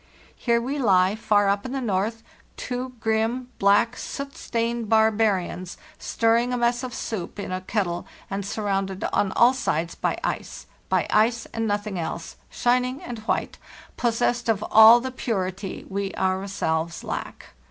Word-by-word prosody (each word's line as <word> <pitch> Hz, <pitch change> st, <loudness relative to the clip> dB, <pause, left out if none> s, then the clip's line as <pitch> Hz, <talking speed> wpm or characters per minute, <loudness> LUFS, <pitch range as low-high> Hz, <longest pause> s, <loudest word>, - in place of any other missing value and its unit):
"Here 235 Hz, -1 st, +1 dB
we 270 Hz, +5 st, -3 dB
lie 190 Hz, -5 st, +4 dB
far 210 Hz, -2 st, +2 dB
up 200 Hz, +1 st, +1 dB
in 255 Hz, -, -5 dB
the 270 Hz, -, -1 dB
north; 225 Hz, 0 st, -1 dB, 0.3 s
two 250 Hz, +1 st, -4 dB
grim, 225 Hz, +3 st, 0 dB
black, 205 Hz, +4 st, +4 dB
soot 275 Hz, +1 st, -6 dB
stained 230 Hz, -1 st, -2 dB
barbarians, 215 Hz, -5 st, +1 dB, 0.2 s
stirring 230 Hz, +2 st, +1 dB
a 250 Hz, -, 0 dB
mess 240 Hz, 0 st, +1 dB
of 255 Hz, -1 st, -5 dB
soup 205 Hz, -5 st, -5 dB
in 200 Hz, -, -5 dB
a 185 Hz, 0 st, -2 dB
kettle 185 Hz, -3 st, -2 dB, 0.2 s
and 200 Hz, 0 st, -3 dB
surrounded 195 Hz, -2 st, -2 dB
on 195 Hz, -, +2 dB
all 240 Hz, +2 st, +5 dB
sides 170 Hz, -10 st, -1 dB
by -, -, -1 dB
ice; -, -, -4 dB, 0.2 s
by -, -, +2 dB
ice 230 Hz, +2 st, +3 dB
and 225 Hz, 0 st, -1 dB
nothing 205 Hz, -2 st, -2 dB
else—shining 245 Hz, +10 st, -2 dB
and 240 Hz, -2 st, -6 dB
white, -, -, -1 dB, 0.4 s
possessed 240 Hz, 0 st, 0 dB
of 215 Hz, -2 st, +1 dB
all 220 Hz, +2 st, +9 dB
the 260 Hz, +1 st, -4 dB
purity 195 Hz, -6 st, -3 dB
we 195 Hz, 0 st, -3 dB
ourselves 185 Hz, -4 st, -1 dB
lack. -, -, -6 dB
220 Hz, 150 wpm, -24 LUFS, 195-240 Hz, 0.4 s, all